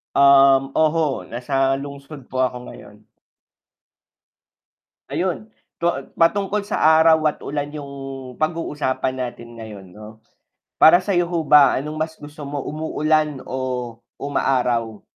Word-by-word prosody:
Um, 135 -1 +5
oho 155 -2 +1
nasa 135 +2 0
lungsod 140 0 -9
po 130 - 0
ako 125 -1 0
ngayon. - - -13 2.0
Ayun 190 +4 -3 0.3
to 170 - +3 0.2
patungkol 200 +4 +1
sa 160 -6 +3
araw 160 0 +6
at 150 - 0
ulan 145 0 -4
yung 145 -2 -7 0.5
pag-uusapan 150 -5 -2
natin 120 -2 -7
ngayon 105 -4 -10
'no. 105 +4 -12 0.7
Para 175 +3 +7
sayo 180 -2 0
ho 170 - 0
ba 145 -1 +7
anong 150 +3 -6
mas 160 +1 -4
gusto 150 0 -10
mo 140 0 -5
umuulan 155 -1 0
o 125 -2 -4 0.2
umaaraw? 125 -6 -1
145 Hz, 120 wpm, -21 LUFS, 130-160 Hz, 2.0 s, Para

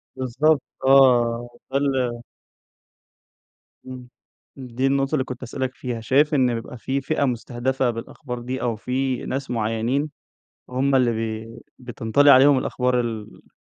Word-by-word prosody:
بالضبط 135 +4 +1 0.3
آه، 120 -3 +4 0.2
تخل 130 -3 0 1.7
امم، 125 -1 -9 0.5
دي 130 0 -2
النقطة 135 +1 0
اللي 130 - +1
كنت 130 -1 -7
هاسألك 130 +1 -4
فيها، 120 -3 -5
شايف 145 +7 +2
إن 130 -3 +3
بيبقى 115 +2 -7
في 135 +4 -2
فئة 140 +1 0
مستهدفة 125 +1 -1
بالأخبار 125 +2 -6
دي 125 +2 -5
أو 120 -2 -1
في 130 +3 -2
ناس 135 0 -4
معينين 115 +6 -1 0.6
هُم 135 +2 +1
اللي 125 -2 +3
بي 110 0 -4 0.3
بتنطلي 125 +3 +3
عليهم 135 +1 +7
الأخبار 125 -1 0 0.2
الfake 105 - -20
130 Hz, 125 wpm, -23 LUFS, 120-135 Hz, 1.7 s, عليهم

